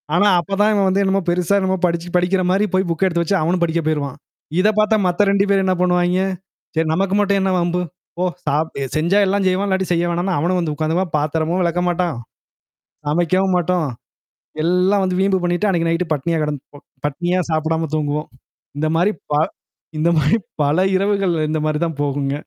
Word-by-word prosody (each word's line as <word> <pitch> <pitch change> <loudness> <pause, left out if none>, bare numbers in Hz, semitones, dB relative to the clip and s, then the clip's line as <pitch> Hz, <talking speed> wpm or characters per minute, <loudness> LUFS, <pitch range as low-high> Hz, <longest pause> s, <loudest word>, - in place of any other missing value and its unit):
ஆனா, 205 +4 +4
அப்பதான் 200 +4 +1
இவன் 200 -2 +2
வந்து 190 +1 +2
என்னமோ 195 0 +1
பெருசா 180 +3 +1
என்னமோ 190 0 0
படிச்சு 170 0 -1
படிக்கிற 180 +2 +2
மாரி 200 +3 +2
போய் 185 0 +1
புக் 165 +3 0
எடுத்து 170 -2 0
வச்சு 185 +4 0
அவனும் 175 +3 0
படிக்க 165 0 0
போயிருவான். 145 -4 -2 0.4
இத 195 - +4
பார்த்தா 215 +1 +3
மத்த 180 +3 +2
2 200 0 +3
பேரு 195 -1 +3
என்ன 185 -1 +2
பண்ணுவாய்ங்க, 180 0 +2 0.5
"சரி 160 0 +1
நமக்கு 195 +3 0
மட்டும் 200 -1 +2
என்ன 190 0 +1
வம்பு? 175 +1 0 0.4
போ - - +1 0.2
சாப் 150 +3 0 0.2
செஞ்சா 170 +6 +2
எல்லாஞ்செய்வோம். 190 0 +1
இல்லாட்டி 190 -1 0
செய்ய 170 0 +1
வேணான்ணு" 175 +2 -1
அவனும் 180 +4 +1
வந்து 165 -3 -1
உட்காந்து 155 +2 -1
பா 190 - +1
பாத்தரமும் 160 +4 -1
விளக்க 175 +1 0
மாட்டான். 175 -3 -1 0.9
சமைக்கவும் 180 +4 +1
மாட்டோம். 175 -2 0 0.8
எல்லாம் 180 +4 +2
வந்து 180 -1 -1
வீம்பு 195 0 +2
பண்ணிட்டு 175 +4 0
அன்னைக்கு 170 -3 +1
நைட்டு 165 +2 0
பட்னியா 165 +4 -1
கடந்து 150 -2 -3 0.5
பட்னியா 175 +5 -1
சாப்பிடாம 160 0 0
தூங்குவோம். 150 0 -2 0.5
இந்த 155 - +1
மாரி 180 +5 +3 0.2
பா 145 - +3 0.6
இந்த 160 +2 +2
மாரி 155 +8 +3 0.2
பல 145 +4 +2 0.2
இரவுகள்ல 195 -4 +1
இந்த 155 0 -1
மாரி 155 -1 0
தான் 160 -3 -5
போகுங்க. 140 -1 -1
175 Hz, 180 wpm, -19 LUFS, 160-190 Hz, 0.9 s, ஆனா